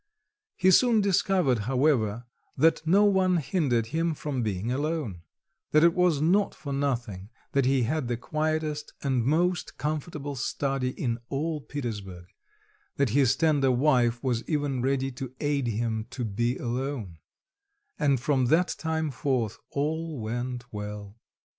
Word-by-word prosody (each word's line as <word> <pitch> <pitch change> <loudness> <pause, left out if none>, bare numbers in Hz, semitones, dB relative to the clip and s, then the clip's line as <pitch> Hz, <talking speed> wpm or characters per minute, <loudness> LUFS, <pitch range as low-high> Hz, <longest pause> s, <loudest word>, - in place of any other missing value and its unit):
He 185 +1 +4
soon 235 +3 +5
discovered, 185 - +2
however, 125 -5 +1 0.3
that 160 +4 +4
no 195 +5 +5
one 190 -3 +3
hindered 140 - +1
him 165 0 0
from 140 -4 -3
being 105 +1 -2
alone; 145 - -2 0.5
that 155 +1 +6
it 170 0 +6
was 180 -5 +2
not 185 +7 +2
for 140 -2 -6
nothing 120 -8 -2 0.2
that 140 -2 +2
he 135 -2 +3
had 145 +2 -1
the 120 -1 -1
quietest 155 +2 -2
and 130 -4 +1
most 175 +7 0
comfortable 150 -1 -3
study 135 0 -1
in 120 -2 -2
all 150 +2 -2
Petersburg; 105 -12 -6 0.7
that 140 -3 +1
his 135 +2 +3
tender 145 -3 +2
wife 125 -3 +2
was 120 -3 0
even 145 -5 0
ready 135 +1 0
to 130 0 -7
aid 145 -3 0
him 110 0 -2
to 125 -3 -4
be 120 +4 -1
alone; 120 - -4 0.8
and 140 -4 +3
from 130 -1 +1
that 170 +7 +3
time 160 -2 -1
forth 120 -4 -1
all 155 +1 -2
went 120 +2 -4
well. 105 0 -6
135 Hz, 140 wpm, -27 LUFS, 120-155 Hz, 0.8 s, that